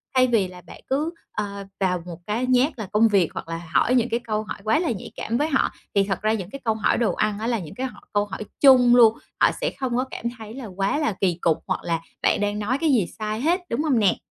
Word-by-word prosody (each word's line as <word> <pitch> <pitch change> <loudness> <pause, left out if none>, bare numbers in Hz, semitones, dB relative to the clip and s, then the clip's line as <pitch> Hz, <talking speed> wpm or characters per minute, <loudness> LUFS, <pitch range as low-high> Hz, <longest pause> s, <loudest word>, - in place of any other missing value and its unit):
thay 255 0 +5
vì 225 -6 +2
là 180 0 -12
bạn - - -13
cứ, 300 +5 0 0.2
à, 200 -1 -4
vào 180 -2 +1
một 175 -1 -8
cái 225 +4 0
nhát 255 +2 +2
là 210 - -4
công 220 +3 +5
việc 195 -6 +3
hoặc - - -6
là 165 0 -4
hỏi 250 - +3
những 245 -1 +2
cái 235 +1 0
câu 215 -2 -2
hỏi - - -6
quá 220 +6 +2
là 335 -5 0
nhạy 205 - -6
cảm 230 +2 -2
với 300 - +1
họ. 275 -4 +2 0.3
Thì 200 - +5
thật 195 -1 -2
ra 215 +1 +2
những 195 -4 -4
cái 275 - -8
câu 225 - +3
hỏi 215 - +1
đồ 235 - +1
ăn 210 -1 0
á 225 - -2
là 235 -3 0
những 160 -4 -9
cái 260 +1 -2
họ 210 -5 -14
câu 205 0 +2
hỏi 210 - -6 0.2
chung 250 -3 +7
luôn, 230 -2 +6 0.2
họ - - +7
sẽ - - 0
không 255 -3 -1
có 255 - +2
cảm - - -7
thấy 220 -1 -9
là 260 0 -7
quá 195 +6 -1
là 300 -8 0
kỳ 180 -3 +2
cục 165 -1 +2
hoặc - - -2
là 165 -1 -1 0.2
bạn - - +2
đang 205 0 -1
nói 230 +6 0
cái 325 - +2
gì 220 -8 +3
sai 215 +1 -2
hết, 340 +6 +2
đúng 260 +7 -1
hông 270 -7 +2
nè? 200 -3 +3
220 Hz, 280 wpm, -24 LUFS, 200-250 Hz, 0.3 s, chung